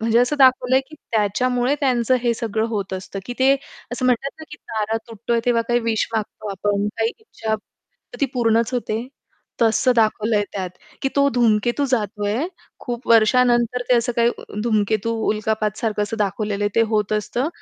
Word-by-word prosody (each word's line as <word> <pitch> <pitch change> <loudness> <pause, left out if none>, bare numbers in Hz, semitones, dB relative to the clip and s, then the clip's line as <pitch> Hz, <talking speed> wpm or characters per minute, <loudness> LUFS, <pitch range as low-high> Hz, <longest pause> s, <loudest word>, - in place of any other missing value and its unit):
म्हणजे 225 +1 +3
असं 250 +4 +1
दाखवलं 255 -1 +5
आहे, 260 - +5
की 310 - -12 0.2
त्याच्यामुळे 245 +5 +1
त्यांचं 255 -3 +2
हे 235 -1 +2
सगळं 220 -1 -1
होत 200 -4 -3
असतं, 190 +1 -6
की 245 - -5
ते 265 +1 +5 0.4
असं 250 +1 -3
म्हणतात 255 +2 +1
ना, 315 - -9
की 295 - -8
तारा 220 -3 -3
तुटतोय 230 +1 -1
तेव्हा 235 -1 +3
काही 240 0 +2
विश 225 -2 0
मागतो 215 -1 -3
आपण, 200 +1 -1
काही 225 +1 +1
इच्छा, 225 - -4
तर 210 - -19
ती 280 - +3
पूर्णच 230 0 +2
होते. 230 -1 -2 0.6
तसं 230 +3 +3
दाखवलं 220 0 +2
आहे 205 - +2
त्यात, 185 -3 -3 0.3
की 270 - +2
तो 280 0 +5
धूमकेतू 240 +3 +2
जातो 210 -3 -1
आहे. 230 +10 0 0.3
खूप 240 -1 -6
वर्षानंतर 240 +1 +4
ते 250 - +5
असं 235 +1 0
काही 235 0 +4 0.3
धूमकेतू, 215 0 +1 0.2
उल्कापातसारखं 215 0 -1
असं 210 +2 -3
दाखवलेलं 205 0 -1
आहे 205 - +1
ते 230 - +6
होत 210 -1 +1
असतं. 240 +7 -1
230 Hz, 175 wpm, -21 LUFS, 215-245 Hz, 0.6 s, ते